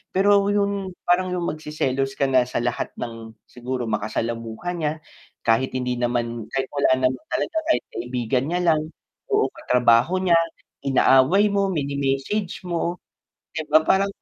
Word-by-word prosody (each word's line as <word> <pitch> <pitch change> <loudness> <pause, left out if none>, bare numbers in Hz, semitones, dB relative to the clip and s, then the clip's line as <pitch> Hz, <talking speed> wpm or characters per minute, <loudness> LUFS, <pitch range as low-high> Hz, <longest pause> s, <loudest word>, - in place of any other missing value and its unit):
Pero 200 +1 +4
yung 200 -2 -1
parang 180 +1 +1
yung 175 -1 -1
magseselos 135 -3 -2
ka 135 -1 +1
na 130 -2 +4
sa 125 - -2
lahat 120 0 -2
ng 115 -1 -7 0.2
siguro 125 -1 -4
makasalamuha 115 - -3
niya, 155 -2 0 0.5
kahit 115 +3 +1
hindi 125 -1 -2
naman 120 -2 -1
kahit 135 -1 -1
wala 140 -2 +1 0.2
naman 130 -1 -7
talaga 330 - -1 0.2
kahit - - -1
kaibigan 125 +1 -2
niya 180 - +1
lang, 155 -1 +3 0.4
o 430 -3 +1
katrabaho 125 +9 +2
niya, 175 -3 +4 0.5
inaaway 135 +9 +4
mo, 200 -1 +1
mini-message 140 +6 -2
mo, 175 -1 -3 0.5
'di 160 -2 -5
ba 155 +1 +5
parang 195 +3 +3
135 Hz, 145 wpm, -23 LUFS, 125-180 Hz, 0.5 s, ba